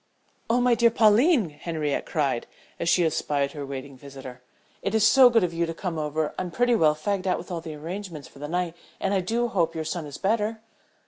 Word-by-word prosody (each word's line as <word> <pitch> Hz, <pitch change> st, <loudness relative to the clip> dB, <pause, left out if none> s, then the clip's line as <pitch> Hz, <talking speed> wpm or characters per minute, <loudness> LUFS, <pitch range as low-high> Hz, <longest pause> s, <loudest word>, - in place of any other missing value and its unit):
"Oh, 235 Hz, +2 st, +3 dB
my 245 Hz, 0 st, +4 dB
dear 235 Hz, 0 st, +4 dB
Pauline!" 225 Hz, -, +4 dB
Henriette 150 Hz, -1 st, -3 dB
cried, 140 Hz, -7 st, -1 dB, 0.3 s
as 170 Hz, -, 0 dB
she 175 Hz, 0 st, +4 dB
espied 145 Hz, -3 st, 0 dB
her 145 Hz, -2 st, -6 dB
waiting 135 Hz, 0 st, -7 dB
visitor. 130 Hz, -2 st, -11 dB, 0.4 s
"It -, -, -1 dB
is 215 Hz, -1 st, +4 dB
so 260 Hz, +2 st, +7 dB
good 230 Hz, -4 st, +3 dB
of 175 Hz, -2 st, -1 dB
you 170 Hz, 0 st, 0 dB
to 165 Hz, -, -5 dB
come 170 Hz, -3 st, -4 dB
over. 155 Hz, 0 st, -2 dB
I'm 185 Hz, -, -3 dB
pretty 245 Hz, +6 st, +2 dB
well 155 Hz, -8 st, +4 dB
fagged 190 Hz, +4 st, -2 dB
out 185 Hz, -, +2 dB
with 180 Hz, -, -9 dB
all 170 Hz, -2 st, -3 dB
the 160 Hz, -2 st, -7 dB
arrangements 165 Hz, -2 st, -7 dB
for 140 Hz, -, -17 dB
the 150 Hz, -, -5 dB
night 175 Hz, +1 st, -2 dB, 0.2 s
and 195 Hz, -, 0 dB
I 195 Hz, -, +3 dB
do 230 Hz, +6 st, 0 dB
hope 170 Hz, -6 st, 0 dB
your 160 Hz, -1 st, -3 dB
son 160 Hz, -1 st, -4 dB
is 145 Hz, -, -8 dB
better." 215 Hz, +2 st, 0 dB
170 Hz, 220 wpm, -25 LUFS, 150-210 Hz, 0.4 s, so